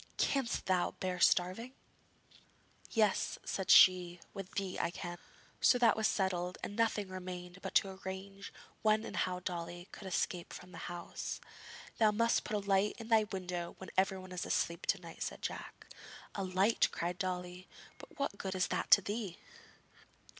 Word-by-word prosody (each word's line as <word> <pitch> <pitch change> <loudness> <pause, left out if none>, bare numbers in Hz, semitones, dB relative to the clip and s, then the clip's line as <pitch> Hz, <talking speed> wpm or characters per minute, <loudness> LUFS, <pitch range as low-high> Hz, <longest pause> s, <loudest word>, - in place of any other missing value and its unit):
Canst 270 -4 0
thou 185 -2 +1
bear 185 -1 -2
starving?' 185 +9 +3 1.2
'Yes,' 215 -4 +2
said 190 - -3
she; 180 -1 +7
'with 195 -2 -7
thee 195 -2 -2
I - - +1
can.' 175 0 -6 0.4
So 250 - +5
that 235 -3 +5
was 220 0 +2
settled, 180 -3 0
and 205 - -4
nothing 215 -3 +1
remained 180 0 -7
but - - -6
to 195 - +5
arrange 195 +1 -6 0.3
when 215 +1 +3
and - - -6
how 180 0 -1
Dolly 175 0 -5
could 195 - -9
escape 180 -1 -2
from 180 0 -10
the - - -9
house. 175 -1 -5 0.6
'Thou 220 -2 +6
must 230 +2 +2
put 215 - -3
a 200 -1 -5
light 195 +1 +3
in 225 -1 -8
thy 220 -2 +5
window 180 -3 -4
when 190 - -9
everyone 190 -1 0
is 180 -1 -3
asleep 170 0 -1
to 195 - +2
night,' 170 -2 -11
said - - -4
Jack. - - -5 0.5
'A 195 - -2
light!' 190 +4 +3
cried 175 +1 -3
Dolly; 180 0 -3 0.3
'but - - -13
what 280 -8 -2
good 190 -1 -3
is 185 - +1
that - - -1
to 200 - +9
thee?' 205 -4 -3
190 Hz, 170 wpm, -34 LUFS, 180-205 Hz, 1.2 s, to